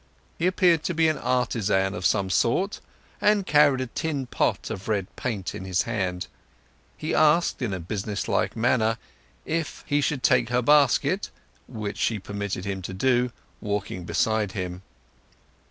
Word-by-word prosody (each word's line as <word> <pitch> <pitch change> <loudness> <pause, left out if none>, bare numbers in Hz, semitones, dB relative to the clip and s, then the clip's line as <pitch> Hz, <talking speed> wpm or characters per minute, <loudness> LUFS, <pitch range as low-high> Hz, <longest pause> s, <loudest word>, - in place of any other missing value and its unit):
He 170 - +2
appeared 180 -3 +3
to 175 - -1
be 160 0 +4
an 155 - -1
artisan 105 -6 +1
of 90 -2 +1
some 95 -1 0
sort, 185 - +1 0.4
and 205 -2 +3
carried 145 -5 +4
a - - -1
tin 140 +2 -3
pot - - -1
of 95 - -6
red 100 -4 -2
paint 105 -7 -3
in - - -6
his 95 -1 0
hand. 90 -3 -2 0.7
He 155 - -3
asked 155 0 +3
in 120 -5 -1
a 95 - -3
business 100 +3 -4
like - - 0
manner 115 -1 +2 0.5
if 160 -1 -3
he 145 0 +1
should 140 -2 -1
take 125 -4 +3
her 125 0 +1
basket, 145 -1 +3 0.4
which 105 -2 -5
she 115 - +1
permitted 100 -1 -4
him 95 -1 -3
to 95 +1 -6
do, 125 +3 +2 0.3
walking 100 -3 -3
beside 110 +2 0
him. 90 -1 -4
115 Hz, 160 wpm, -25 LUFS, 95-145 Hz, 0.7 s, be